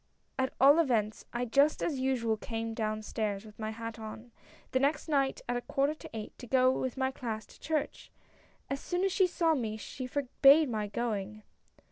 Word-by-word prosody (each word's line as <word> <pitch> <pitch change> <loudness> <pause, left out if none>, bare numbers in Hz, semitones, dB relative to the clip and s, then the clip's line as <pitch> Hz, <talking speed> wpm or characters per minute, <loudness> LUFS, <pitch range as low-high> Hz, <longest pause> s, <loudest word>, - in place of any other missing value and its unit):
At 260 0 +1
all 280 +4 +7
events 225 -9 +1
I, 240 +1 -1
just 280 +6 +3
as 290 -6 -1
usual, 250 -4 +1
came 225 +1 -4
down 215 -1 -2
stairs 210 -1 -3
with 215 0 -14
my 215 0 -3
hat 230 +1 -6
on, 220 +2 -8 0.4
the 260 - +2
next 290 +4 +1
night 275 -3 +1
at 245 - -1
a - - -3
quarter 275 +4 0
to 310 - -11
eight, 220 -1 -7
to 245 - -9
go 255 +1 +4
with 260 0 -2
my 265 0 +1
class 220 -4 -5
to - - -18
church. 310 -1 -3 0.6
As 275 - -3
soon 355 +4 -2
as 390 - +2
she 380 0 +4
saw 335 -2 +2
me 225 -7 -2
she 255 +4 -6
forbade 280 +2 +5
my 215 -3 -2
going." 215 -1 -3
245 Hz, 195 wpm, -31 LUFS, 220-275 Hz, 0.6 s, all